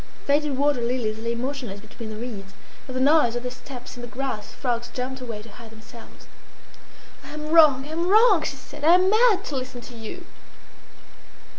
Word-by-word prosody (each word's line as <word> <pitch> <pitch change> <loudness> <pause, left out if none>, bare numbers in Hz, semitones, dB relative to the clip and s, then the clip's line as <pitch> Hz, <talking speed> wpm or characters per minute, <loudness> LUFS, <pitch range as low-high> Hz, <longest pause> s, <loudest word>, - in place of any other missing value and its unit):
Faded 290 -1 +1
water 285 -2 +2
lilies 235 -3 -1
lay 230 +1 -2
motionless 245 -5 -4
between 220 +1 -10
the 215 - -6
reeds. 210 -4 -7 0.3
At 255 - -7
the - - 0
noise 275 -3 +4
of 240 - -3
their 250 - -4
steps 250 0 -10
in 245 - -9
the 240 - -6
grass, 255 -4 -4
frogs 240 -2 -2
jumped 255 +1 -5
away 225 -4 -6
to 225 - -13
hide 230 +1 -13
themselves. 225 +1 -14 1.0
"I 275 - -11
am 300 0 -6
wrong! 300 -5 +6
I - - -9
am 335 +2 -1
wrong!" 425 -4 +6
she 285 - -3
said. 285 +2 -12
"I 330 +3 +7
am 370 +2 +4
mad 430 -3 +4
to 290 - -4
listen 255 -1 -5
to 240 0 -11
you!" 225 -1 -8
255 Hz, 195 wpm, -24 LUFS, 235-295 Hz, 1.0 s, I